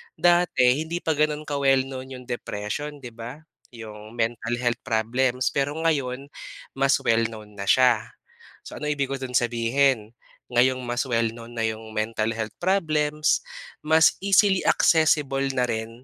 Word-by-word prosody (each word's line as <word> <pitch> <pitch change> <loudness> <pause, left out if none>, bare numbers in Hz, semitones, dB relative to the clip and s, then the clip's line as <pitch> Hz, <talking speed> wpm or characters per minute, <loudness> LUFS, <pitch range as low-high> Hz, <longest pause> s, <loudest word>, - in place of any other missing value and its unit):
Dati, 175 -3 +3 0.2
hindi 165 +2 -3
pa 160 - +1
ganon 150 0 0
ka 145 -1 -2
well 135 -1 +3
known 130 -1 -7
'yong 125 -1 -8
depression 120 +6 -4
'di 120 - -7
ba, 120 +5 -8 0.4
'yong 110 -1 -10
mental 115 0 -1
health 120 -1 0
problems, 125 +3 0
pero 140 +1 -1
ngayon 140 -5 -1 0.5
mas 135 0 +3
well 115 0 +3
known 110 -2 -11
na 100 -1 -6
siya. 130 +4 +3 0.5
So, - - -10
ano 150 - -4
ibig 140 -2 -2
ko - - -1
do'n 130 -2 -5
sabihin, 120 0 +1 0.4
ngayong 130 +2 +3
mas 120 0 -1
well 115 -2 +1
known 115 0 -11
na - - 0
'yong 110 0 -6
mentall 110 0 -1
health 110 -1 -5
problems, 155 -5 +1 0.4
mas 160 +1 +5
easily 195 -1 +4
accessible 150 -4 +3
na 125 -1 +1
rin 115 +1 -5
130 Hz, 155 wpm, -24 LUFS, 115-150 Hz, 0.5 s, mas